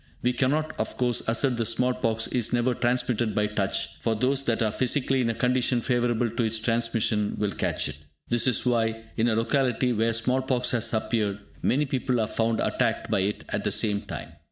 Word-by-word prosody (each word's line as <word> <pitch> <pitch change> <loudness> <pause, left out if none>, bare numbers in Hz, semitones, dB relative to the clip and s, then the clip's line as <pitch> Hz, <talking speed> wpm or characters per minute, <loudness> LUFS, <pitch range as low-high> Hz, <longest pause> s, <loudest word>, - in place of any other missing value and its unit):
We 125 +1 +2
cannot, 150 +5 0
of - - -3
course, 125 -2 +1
assert 120 +2 +2
that 115 - 0
small 125 +3 +2
pox 115 -2 0
is 120 -2 0
never 120 +1 +2
transmitted 120 -2 0
by 105 - +2
touch, 105 -2 -2
for 115 - 0
those 130 +5 +1
that 115 -1 +1
are 110 - +1
physically 130 +2 +1
in 115 - +1
a 115 - -1
condition 125 0 +1
favourable 120 -1 +1
to 115 +2 -3
its 110 0 +1
transmission 115 -2 0
will 105 -1 0
catch - - -1
it. - - -7 0.3
This 120 +1 +2
is 125 - +2
why, 115 -2 +1
in 115 - +1
a 115 - +2
locality 125 +1 +1
where 115 +1 +1
small 125 +3 +1
pox 130 -1 0
has 120 -3 0
appeared, 110 -2 0 0.2
many 145 +4 +2
people 130 -2 -1
are 110 - +2
found 115 +1 0
attacked - - 0
by - - +2
it 100 +2 -1
at - - -2
the - - 0
same 105 -2 +1
time. - - -7
120 Hz, 205 wpm, -26 LUFS, 110-125 Hz, 0.3 s, We